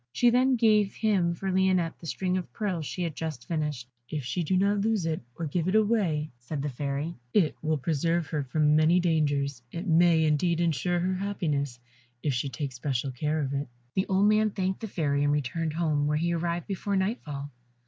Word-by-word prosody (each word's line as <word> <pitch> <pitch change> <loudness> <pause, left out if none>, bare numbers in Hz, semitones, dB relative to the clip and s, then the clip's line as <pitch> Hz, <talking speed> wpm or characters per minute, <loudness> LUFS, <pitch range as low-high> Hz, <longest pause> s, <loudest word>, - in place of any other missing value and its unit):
She 240 - +4
then 255 +2 +4
gave 215 -4 +3
him 190 -6 +1
for 190 +3 -3
Lionette 185 -3 +1
the 165 - -9
string 185 +2 -1
of 185 -2 -3
pearls 185 -8 -2
she 180 - -3
had 165 -4 -3
just 155 -7 -5
finished. 150 -7 -2 0.2
"If 150 -3 -3
she 175 - -1
do 185 +3 +1
not 200 +2 +2
lose 215 -4 +1
it, 160 -1 -1 0.2
or 170 - -3
give 165 +3 -1
it 185 - +1
away," 200 -9 +2
said 140 +4 -5
the 145 - -1
Fairy, 140 +5 -3 0.2
"it 170 -8 +3
will 155 0 +1
preserve 165 +3 0
her 150 -3 -1
from 150 +2 +2
many 155 +3 +5
dangers. 145 -6 +1
It 170 +3 -5
may, 165 -2 +4
indeed, 160 +3 +2
insure 170 +1 +1
her 185 +2 0
happiness 155 -9 -2 0.5
if 145 - +1
she 125 +3 -1
take 135 +2 -4
special 130 +1 -2
care 150 +5 -1
of 140 -1 -2
it." 140 +1 -2 0.3
The 190 - 0
old 195 +2 +3
man 215 0 +4
thanked 190 -2 -2
the 225 - -5
Fairy 145 -7 0
and 145 - +3
returned 150 +3 -1
home, 155 -3 +1
where 150 0 +1
he 170 +2 0
arrived 170 0 -1
before 200 +1 -2
nightfall. 150 - -2
165 Hz, 205 wpm, -28 LUFS, 145-190 Hz, 0.5 s, many